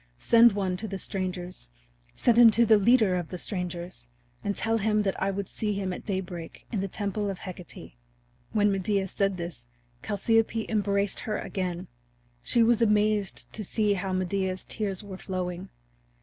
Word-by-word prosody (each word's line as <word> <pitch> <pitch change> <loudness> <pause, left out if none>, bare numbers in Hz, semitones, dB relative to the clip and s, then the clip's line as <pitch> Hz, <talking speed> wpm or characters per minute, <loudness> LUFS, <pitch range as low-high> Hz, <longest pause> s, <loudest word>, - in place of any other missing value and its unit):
Send 235 -1 +6
one 190 -2 -1
to 220 - -5
the 195 -1 -4
strangers 180 - -4 0.5
send 240 - +3
him 235 -1 +9
to 235 - +6
the 220 -1 +6
leader 215 -3 +4
of 175 -2 -2
the 180 - -6
strangers, 175 - -5 0.4
and 200 - -1
tell 225 0 +1
him 210 0 +2
that 195 -2 -2
I 195 - +2
would 195 -1 -3
see 210 -1 -2
him 195 -2 -2
at - - -8
daybreak 180 -4 -5
in 210 -5 -1
the 195 - -2
temple 205 +1 -2
of 195 - -4
Hecate." 180 - -9 0.6
When 210 -1 +3
Medea 195 0 0
said 195 0 0
this 170 -9 -7 0.4
Chalciope 225 +2 +1
embraced 200 -2 +1
her 215 -1 -2
again. 180 -3 -4 0.5
She 235 - +3
was 235 0 +3
amazed 210 -2 +2
to 215 - -3
see 210 +1 +1
how 190 0 -3
Medea's 185 0 -1
tears 200 -2 -3
were 195 -2 -8
flowing. 185 0 -4
195 Hz, 170 wpm, -27 LUFS, 185-215 Hz, 0.6 s, him